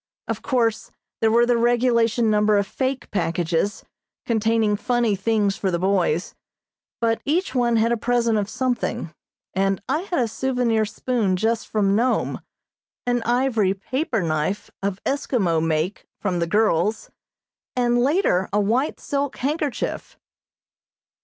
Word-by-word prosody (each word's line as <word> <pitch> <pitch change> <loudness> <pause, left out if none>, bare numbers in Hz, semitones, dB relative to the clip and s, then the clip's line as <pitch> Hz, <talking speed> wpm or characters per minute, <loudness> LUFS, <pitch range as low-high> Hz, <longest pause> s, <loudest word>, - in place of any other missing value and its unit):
Of - - -3
course 235 -5 0 0.3
there 225 - +3
were 235 +2 +4
the 240 0 +2
regulation 235 -1 +2
number 210 0 +3
of 200 - +2
fake 260 +4 -3
packages, 175 +1 -1 0.4
containing 225 -2 +2
funny 240 -1 +1
things 205 0 0
for 195 - -1
the 175 - 0
boys, 180 -1 0 0.7
but 230 -1 +1
each 330 +1 0
one 240 -2 +2
had 230 +1 +2
a 235 - +2
present 235 -1 +1
of 205 0 -3
something, 240 -8 -2 0.4
and 195 0 +1
I 305 - +1
had 360 -1 -3
a 240 - +2
souvenir 240 -2 0
spoon 215 -2 -1
just 225 +4 0
from 200 -2 +1
Nome, 245 +4 0 0.6
an 245 -1 +1
ivory 240 -6 +2
paper 240 - -2
knife 160 +6 -2
of 195 -1 -2
Eskimo 210 - 0
make 165 +4 -1
from 185 -4 -1
the 170 - 0
girls, 210 +1 +1 0.6
and 245 -1 +2
later 270 - +2
a 210 - +2
white 235 +8 0
silk 280 -1 -2
handkerchief. 290 0 -3
225 Hz, 140 wpm, -23 LUFS, 195-245 Hz, 0.7 s, were